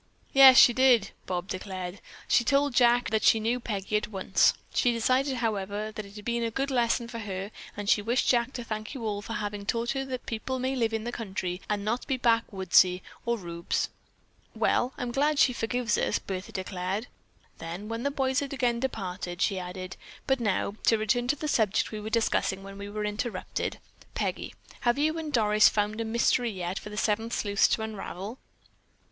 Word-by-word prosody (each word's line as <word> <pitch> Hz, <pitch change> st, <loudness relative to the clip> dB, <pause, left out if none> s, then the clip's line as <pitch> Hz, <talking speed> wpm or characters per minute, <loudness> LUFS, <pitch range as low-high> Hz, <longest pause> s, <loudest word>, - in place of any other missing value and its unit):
"Yes, 270 Hz, -1 st, +9 dB
she 240 Hz, -, +9 dB
did," 245 Hz, -5 st, +4 dB, 0.2 s
Bob 180 Hz, 0 st, -2 dB
declared. 185 Hz, -1 st, -5 dB, 0.3 s
"She 240 Hz, -, +4 dB
told 280 Hz, +2 st, +2 dB
Jack 240 Hz, -1 st, +4 dB
that 220 Hz, -1 st, +2 dB
she 225 Hz, -, +5 dB
knew 230 Hz, +3 st, 0 dB
Peggy 210 Hz, -3 st, -2 dB
at 210 Hz, -, -3 dB
once. 195 Hz, -2 st, +2 dB, 0.2 s
She 245 Hz, -, +3 dB
decided, 255 Hz, +4 st, +1 dB
however, 210 Hz, -2 st, -2 dB
that 215 Hz, -1 st, -6 dB
it 200 Hz, -, -15 dB
had 210 Hz, -1 st, -10 dB
been 235 Hz, 0 st, 0 dB
a 230 Hz, -, 0 dB
good 275 Hz, +5 st, -2 dB
lesson 235 Hz, -1 st, +1 dB
for 230 Hz, -1 st, -6 dB
her 195 Hz, -1 st, -5 dB, 0.3 s
and 205 Hz, -1 st, -5 dB
she 205 Hz, -, +4 dB
wished 235 Hz, +5 st, 0 dB
Jack 240 Hz, 0 st, +3 dB
to 245 Hz, -, -5 dB
thank 215 Hz, +2 st, -5 dB
you 240 Hz, -4 st, -5 dB
all 205 Hz, -1 st, -2 dB
for 225 Hz, -, -6 dB
having 205 Hz, -1 st, -4 dB
taught 230 Hz, +3 st, -1 dB
her 270 Hz, 0 st, -2 dB
that 255 Hz, -2 st, -5 dB
people 240 Hz, +3 st, -3 dB
may 260 Hz, +1 st, -1 dB
live 230 Hz, -3 st, +1 dB
in 220 Hz, -1 st, -2 dB
the 240 Hz, -, -3 dB
country 190 Hz, -5 st, -4 dB
and 205 Hz, -1 st, -1 dB
not 235 Hz, +4 st, -1 dB
be 265 Hz, -, 0 dB
backwoodsy 190 Hz, -6 st, +3 dB, 0.2 s
or 235 Hz, 0 st, +1 dB
rubes." 170 Hz, -3 st, -2 dB, 0.7 s
"Well, 245 Hz, -, +1 dB
I'm 245 Hz, -1 st, -3 dB
glad 290 Hz, +4 st, +1 dB
she 255 Hz, -, +5 dB
forgives 235 Hz, -1 st, 0 dB
us!" -, -, +1 dB
Bertha 185 Hz, -1 st, -6 dB
declared. 190 Hz, +3 st, -3 dB, 0.5 s
Then, 170 Hz, +5 st, -6 dB
when 230 Hz, +1 st, -4 dB
the 280 Hz, -, 0 dB
boys 265 Hz, -1 st, 0 dB
had 280 Hz, -1 st, -4 dB
again 245 Hz, -3 st, +1 dB
departed, 185 Hz, -8 st, -4 dB
she 195 Hz, -1 st, +1 dB
added: 185 Hz, 0 st, -7 dB, 0.3 s
"But 265 Hz, -1 st, +1 dB
now, 205 Hz, -2 st, -1 dB
to 225 Hz, -, +5 dB
return 220 Hz, +3 st, 0 dB
to 285 Hz, -, +2 dB
the 305 Hz, +1 st, -4 dB
subject 220 Hz, -7 st, +1 dB
we 215 Hz, -, -5 dB
were 215 Hz, -, -5 dB
discussing 220 Hz, -4 st, 0 dB
when 195 Hz, 0 st, -10 dB
we 200 Hz, 0 st, -6 dB
were 210 Hz, 0 st, -3 dB
interrupted. 210 Hz, -1 st, -3 dB, 0.4 s
Peggy, -, -, -3 dB, 0.2 s
have 240 Hz, +1 st, +1 dB
you 315 Hz, +3 st, +1 dB
and 310 Hz, -2 st, -5 dB
Doris 215 Hz, -4 st, +5 dB
found 210 Hz, +1 st, -1 dB
a -, -, -2 dB
mystery 235 Hz, +1 st, +2 dB
yet 185 Hz, -2 st, -4 dB
for -, -, -9 dB
the 210 Hz, -, -8 dB
Seven 220 Hz, +2 st, 0 dB
Sleuths 205 Hz, -3 st, +2 dB
to 220 Hz, -, 0 dB
unravel?" 210 Hz, +1 st, -6 dB
220 Hz, 200 wpm, -28 LUFS, 200-245 Hz, 0.7 s, Yes